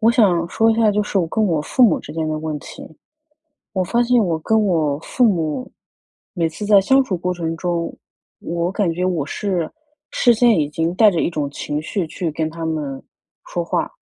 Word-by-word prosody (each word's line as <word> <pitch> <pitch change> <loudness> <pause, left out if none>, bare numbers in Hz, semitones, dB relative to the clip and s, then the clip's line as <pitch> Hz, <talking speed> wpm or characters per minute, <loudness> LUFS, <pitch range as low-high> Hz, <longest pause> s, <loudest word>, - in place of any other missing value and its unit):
我 225 +1 +5
想 180 -8 +3
说 225 +5 +2
一 - - +2
下 225 -1 +3
就 210 +1 +1
是 205 -1 -1
我 175 - +1
跟 220 +5 +1
我 165 -6 +1
父 255 - +1
母 235 - +5
之 150 - -10
间 160 0 -2
的 155 0 -2
问 155 -1 -4
题。 - - -11 0.9
我 185 -2 0
发 235 +7 +1
现 240 -2 +3
我 165 -3 -1
跟 220 +6 +2
我 155 -6 +1
父 250 - 0
母， 185 +3 0 0.6
每 170 -4 +1
次 165 +6 -6
在 205 -1 +6
相 265 +8 +4
处 190 - -2
过 180 +1 -2
程 165 -2 -3
中， 170 -1 -2 0.5
我 170 +2 -2
感 195 -4 0
觉 180 +2 -2
我 175 -6 0
是 180 -3 -2 0.4
事 240 -1 +3
先 230 -3 +4
已 150 -2 +1
经 165 +3 -2
带 215 +2 +6
着 170 -4 -1
一 - - 0
种 150 -4 -2
情 145 +1 -4
绪 180 +2 -2
去 165 +1 -3
跟 155 +1 -2
他 165 0 -6
们 150 -4 -3 0.4
说 - - -3
话。 - - -1
175 Hz, 230 characters per minute, -20 LUFS, 160-210 Hz, 0.9 s, 在